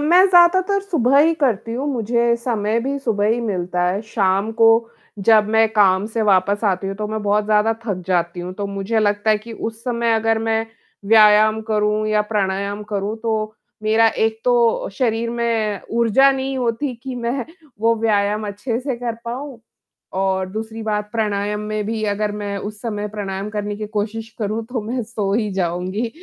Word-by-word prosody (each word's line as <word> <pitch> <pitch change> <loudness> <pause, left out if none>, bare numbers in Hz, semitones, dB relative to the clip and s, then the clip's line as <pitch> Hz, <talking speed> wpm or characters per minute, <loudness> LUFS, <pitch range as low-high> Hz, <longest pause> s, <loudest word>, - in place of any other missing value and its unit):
मैं 345 +5 +5
ज़्यादातर 370 +2 +4
सुबह 280 - +2
ही 320 +3 +4
करती 230 -4 0
हूँ। 260 +5 -3
मुझे 235 0 +1
समय 230 -2 -1
भी 275 +3 -2
सुबह 220 -6 0
ही 230 +2 +1
मिलता 180 -5 -2
है। 190 +3 -1
शाम 200 -1 0
को 225 - +8 0.5
जब 210 +1 +4
मैं 220 0 +4
काम 195 -2 +3
से 225 +1 -2
वापस 200 +1 +2
आती 195 -1 0
हूँ, 195 - -3
तो 215 - -3
मैं 220 0 -3
बहुत 205 +1 +1
ज़्यादा 215 +1 +3
थक 195 -5 -3
जाती 175 -1 0
हूँ। 180 +1 -6
तो 200 +1 -4
मुझे 200 +3 -2
लगता 205 0 +1
है 215 - +3
कि 230 +2 -11
उस 225 0 -6
समय 235 -2 0
अगर 225 0 +1
मैं 225 0 0 0.4
व्यायाम 215 0 +6
करूँ 210 0 +1
या 210 0 +2
प्राणायाम 200 0 -1
करूँ, 205 +2 -2
तो 220 -1 -2 0.3
मेरा 220 +1 +4
एक 220 0 -1
तो 240 -2 +2
शरीर 230 0 -1
में 230 -3 -1 0.2
ऊर्जा 235 +4 +5
नहीं 270 0 -3
होती 250 +2 -1
कि 260 -1 -5
मैं 240 +1 -2 0.4
वो 230 +1 +3
व्यायाम 210 -1 0
अच्छे 210 +4 -3
से 260 -1 -3
कर 235 -1 -3
पाऊँ 255 +2 -6 0.6
और 190 -1 0
दूसरी 220 +2 -6
बात 210 -1 -2
प्राणायाम 210 -2 -1
में 210 0 -3
भी 220 0 -3
अगर 210 0 -2
मैं 205 -1 -4
उस 210 +1 -7
समय 210 -3 -3
प्राणायाम 200 -1 -5
करने 205 -1 -3
की 215 0 -5
कोशिश 220 +1 -4
करूँ, 220 +1 -2
तो 240 0 -4
मैं 240 +3 -3
सो 210 -3 -3
ही 215 -1 0
जाऊँगी। 185 +5 -2
215 Hz, 185 wpm, -20 LUFS, 205-235 Hz, 0.6 s, को